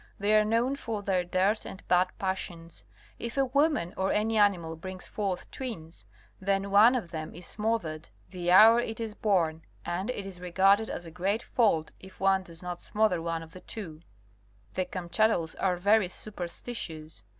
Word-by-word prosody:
They 205 +2 +2
are 215 - +6
known 230 +5 +1
for 220 -6 -4
their 185 -2 +1
dirt 185 +4 +1
and 195 - -10
bad 180 +1 +4
passions, 175 -3 -4 0.4
If 235 +3 -5
a 270 - +4
woman 280 - +1
or 190 0 0
any 220 +2 +1
animal 185 -6 +2
brings 185 +3 -8
forth 195 -4 -3
twins 165 - -7 0.3
then 195 +1 0
one 220 +5 +7
of 205 -9 -3
them 155 -2 -6
is 175 +1 -9
smothered, 210 -8 -2 0.2
the 175 -2 -3
hour 220 +6 +8
it 225 -2 -3
is 225 -2 -4
born, 170 -7 +1 0.2
and 185 +6 -2
it 205 -6 -3
is 185 -2 -9
regarded 195 +4 +3
as 175 - -5
a 165 - -9
great 195 +6 -1
fault 170 -10 +1
if 190 0 -14
one 195 0 +3
does 170 -1 -11
not 175 -1 -5
smother 210 -5 +1
one 165 0 -3
of 165 0 -14
the 185 - -11
two. 165 -8 -8 0.7
The 185 - -1
Kamchadales 180 -1 0
are 180 -2 +1
very 200 +1 +3
superstitious. 170 - -7
190 Hz, 175 wpm, -29 LUFS, 175-215 Hz, 0.7 s, hour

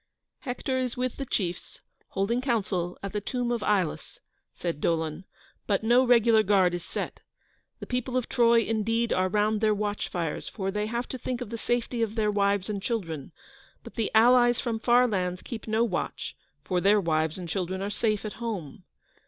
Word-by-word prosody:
"Hector 260 0 -2
is 250 -2 -2
with 255 0 -2
the 275 - -4
chiefs, 180 -6 -3 0.3
holding 210 +6 0
council 200 -8 -1
at 200 - -4
the 210 - -1
tomb 245 +3 -2
of 235 -2 -1
Ilus," 195 -7 -1 0.4
said 170 -4 -3
Dolon; 160 +1 -1 0.4
"but 205 0 +1
no 240 +3 +5
regular 235 -3 +5
guard 190 -3 +3
is 175 - -3
set. - - -5 0.6
The - - -6
people 250 0 -2
of 250 - -1
Troy, 235 -1 +4
indeed, 225 +2 0
are 185 0 +1
round 210 +2 +1
their 215 -1 +3
watch 205 0 -2
fires, 165 -4 -3
for 195 -1 -3
they 210 +1 -1
have 235 +2 -2
to 260 - -5
think 250 0 -3
of 245 -3 -6
the 230 - -3
safety 240 0 -1
of 225 -1 -1
their 215 -2 +2
wives 200 -1 +1
and 205 -2 -3
children; 165 - -3 0.5
but - - -11
the 225 -3 -1
allies 240 +1 +6
from 230 -2 -2
far 245 +2 +4
lands 180 -4 -2
keep 230 -3 -7
no 220 +1 +2
watch, 195 -7 -3 0.3
for 180 +4 0
their 205 +2 +5
wives 160 -3 0
and 180 -2 -6
children 185 +1 -2
are 200 - -2
safe 215 -1 0
at 215 - -4
home." 200 - -5
215 Hz, 190 wpm, -27 LUFS, 185-235 Hz, 0.6 s, allies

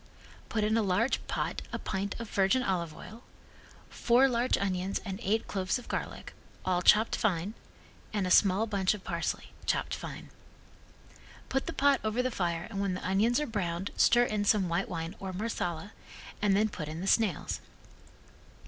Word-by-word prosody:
Put 215 -3 0
in 215 +1 +2
a - - +3
large 205 +5 +1
pot - - -2
a - - -2
pint 200 +1 -3
of 230 - -5
virgin 200 +6 +2
olive 170 -6 -1
oil, 225 +2 -11 0.7
four 250 +3 +4
large 245 0 +1
onions 190 -1 -1
and 195 -1 -4
eight 220 0 +1
cloves 190 +1 -1
of 245 - -11
garlic, - - -5 0.3
all 180 -1 +1
chopped 215 +5 +5
fine, 195 -2 0 0.6
and 205 -3 0
a 180 - -1
small 200 +3 +5
bunch 200 -2 +1
of 200 - -11
parsley, - - -3
chopped - - 0
fine. - - -7 1.2
Put 270 0 -1
the - - -1
pot 280 -1 +3
over 220 +3 0
the 255 - 0
fire 170 -5 -1
and 200 -2 -2
when 195 -2 0
the 185 - -4
onions 215 +7 +3
are 300 - 0
browned 190 -5 -2
stir 240 +1 +5
in 215 -3 0
some 205 -3 +3
white 170 - -1
wine 165 +2 -4
or 190 -1 -5
Marsala 185 -3 -3 0.5
and 200 -1 +3
then 215 +1 +3
put 155 -7 -6
in 155 +1 -5
the - - -3
snails. 195 -5 +1
200 Hz, 175 wpm, -30 LUFS, 185-225 Hz, 1.2 s, chopped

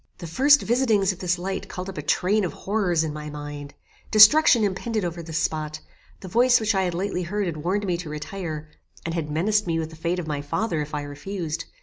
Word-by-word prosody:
The 175 - -8
first 270 - +4
visitings 225 -5 +2
of 185 - -10
this 180 -1 0
light 190 +2 -4
called 180 +1 -6
up 195 - -7
a - - -2
train 190 +8 +1
of 180 - -2
horrors 190 -6 0
in 155 -2 -3
my 150 0 -6
mind; 145 -1 -8 0.3
destruction 225 +3 +7
impended 210 +1 -1
over 170 0 -4
this 160 -1 -5
spot; 155 -1 -2 0.4
the 190 - -8
voice 245 +6 +4
which 220 0 +1
I 190 - +2
had 175 -1 -2
lately 185 0 -2
heard 200 +4 -2
had 170 -3 -3
warned 190 +7 -1
me 180 -3 0
to 170 -3 -7
retire, 155 0 -5 0.4
and 165 - -2
had 165 -3 -3
menaced 205 +7 +1
me 165 -1 0
with 160 0 -3
the - - -11
fate 170 +3 -2
of 180 - -3
my 150 -2 -3
father 165 +3 -1
if 150 +1 -5
I 145 - -3
refused. 160 +3 -5
175 Hz, 230 wpm, -24 LUFS, 155-205 Hz, 0.4 s, destruction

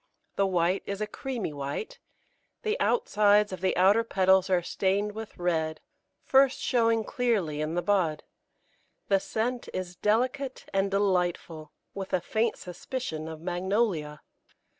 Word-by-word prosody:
The 195 - +2
white 180 0 +1
is 200 0 -3
a 215 - 0
creamy 230 - -4
white, 145 - -5 0.6
the 435 -1 0
outsides 210 - +3
of 185 - -6
the 190 - +1
outer 200 +5 +5
petals 190 -3 +3
are 180 -2 +2
stained 200 +4 0
with 220 +1 -8
red, 160 -3 -1 0.5
first 270 0 +4
showing 230 -3 +2
clearly 205 -13 0
in 155 +2 -2
the 175 - 0
bud. 175 -5 +1 0.9
The 195 -1 +4
scent 235 +5 -3
is 180 -1 -4
delicate 255 +7 0
and 195 0 +1
delightful, 180 -5 -1 0.2
with 195 -1 -6
a 185 - +3
faint 220 +5 -1
suspicion 180 -3 -5
of 160 -1 -8
Magnolia. 180 -3 -1
195 Hz, 140 wpm, -28 LUFS, 175-225 Hz, 0.9 s, outer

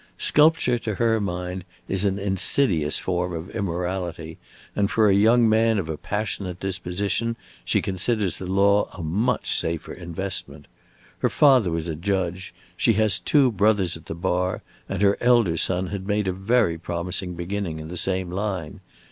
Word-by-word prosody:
Sculpture, 150 -5 +3
to 110 -3 -4
her 115 +1 +1
mind, 90 -1 -4 0.2
is 95 +1 +1
an 100 -1 +1
insidious 95 - +2
form 90 -1 -2
of 85 +2 -6
immorality, 90 -3 -4 0.4
and 100 -1 +1
for 110 0 +3
a 100 - +4
young 115 +4 +5
man 110 0 +3
of 85 -5 -3
a 80 - -2
passionate 100 -1 -4
disposition 95 +4 -2 0.3
she - - 0
considers 100 0 -1
the 95 - -7
law 100 +2 +3
a 90 - -6
much 95 +10 0
safer 80 -1 -3
investment. 85 -4 -6 0.5
Her - - +1
father 130 -9 +4
was 80 0 -3
a 80 - -2
judge, 95 +1 -2 0.2
she 115 - +2
has 110 -1 +2
two 140 -4 +3
brothers 105 -4 +2
at 80 - -12
the 80 - -5
bar, 90 +1 -1 0.3
and 95 +1 -2
her 100 0 +3
elder 120 -8 +3
son 90 +2 +1
had 95 -1 -5
made 105 -1 0
a 95 - 0
very 95 -3 +1
promising 90 +2 -3
beginning 90 -1 -4
in 80 - -7
the 90 - -7
same 90 0 -1
line. 95 -4 -4
95 Hz, 165 wpm, -24 LUFS, 90-105 Hz, 0.5 s, young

